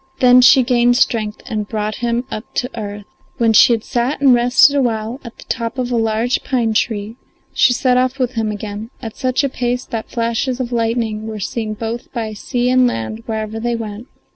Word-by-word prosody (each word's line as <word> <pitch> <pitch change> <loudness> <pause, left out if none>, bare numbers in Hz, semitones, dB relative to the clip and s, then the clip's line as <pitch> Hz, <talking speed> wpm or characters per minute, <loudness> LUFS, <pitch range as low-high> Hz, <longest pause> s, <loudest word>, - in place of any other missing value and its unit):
Then 250 0 +6
she 255 +1 +7
gained 245 -1 +3
strength 215 -4 0
and 210 -2 -3
brought 215 -1 -3
him 235 0 -1
up 215 - -5
to 250 - -1
earth. 205 -2 -6 0.3
When 230 -1 +3
she 220 - +7
had 225 -2 +1
sat 245 +4 -1
and 275 -2 +5
rested 245 +4 +5
a 280 - +3
while 230 +1 -2
at 235 -2 -11
the - - -12
top 230 +2 -4
of 250 -1 -2
a - - +1
large 225 +2 0
pine 235 -5 0
tree 215 0 -1 0.4
she - - +4
set 250 0 +2
off 255 +1 +1
with 255 -2 0
him 220 -3 -1
again 210 +1 -6
at 225 -3 -7
such 255 +2 0
a - - +2
pace 250 0 -2
that 225 -1 -5
flashes 235 +2 -1
of 250 -1 -3
lightning 225 -2 -1
were 215 -1 -5
seen 215 +2 -3
both 230 +2 -5
by 225 -3 -3
sea 245 +3 -2
and 255 0 +4
land 165 - -4
wherever 220 0 -3
they 240 +1 -1
went. 220 +1 -6
235 Hz, 210 wpm, -18 LUFS, 220-250 Hz, 0.4 s, she